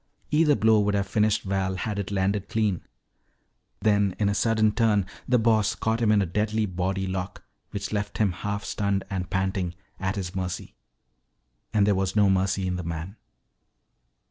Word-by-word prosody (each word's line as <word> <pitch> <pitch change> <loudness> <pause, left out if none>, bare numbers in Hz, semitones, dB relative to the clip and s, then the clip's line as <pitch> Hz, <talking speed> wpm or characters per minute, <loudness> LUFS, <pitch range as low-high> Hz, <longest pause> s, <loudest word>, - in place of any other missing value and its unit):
Either 150 -1 +4
blow 110 0 +4
would 105 0 +1
have 100 -1 +1
finished 105 +1 +1
Val 95 -1 -1
had 100 +2 -3
it 100 - -3
landed 100 0 0
clean. 105 -6 0 1.0
Then 100 -3 +2
in 105 -2 +2
a - - +1
sudden 110 +1 +2
turn 105 -3 +2 0.2
the 125 - +4
Boss 110 -2 +2
caught 110 +1 -1
him 110 -2 +4
in 105 -2 +4
a - - -1
deadly 105 +4 0
body 95 +1 -2
lock 95 0 -4 0.3
which 100 +1 -5
left 105 -1 -2
him 105 -3 +2
half 100 +3 -4
stunned 100 -2 -1
and 90 -2 -3
panting, 95 -2 -1 0.2
at 95 +2 -1
his 95 -3 -4
mercy. 90 -1 -4 1.0
And 105 -2 +3
there 105 - +3
was 95 0 -1
no 100 -2 +5
mercy 95 0 +1
in 90 0 -1
the 90 - -4
man. 85 +4 -5
100 Hz, 175 wpm, -26 LUFS, 95-105 Hz, 1.0 s, no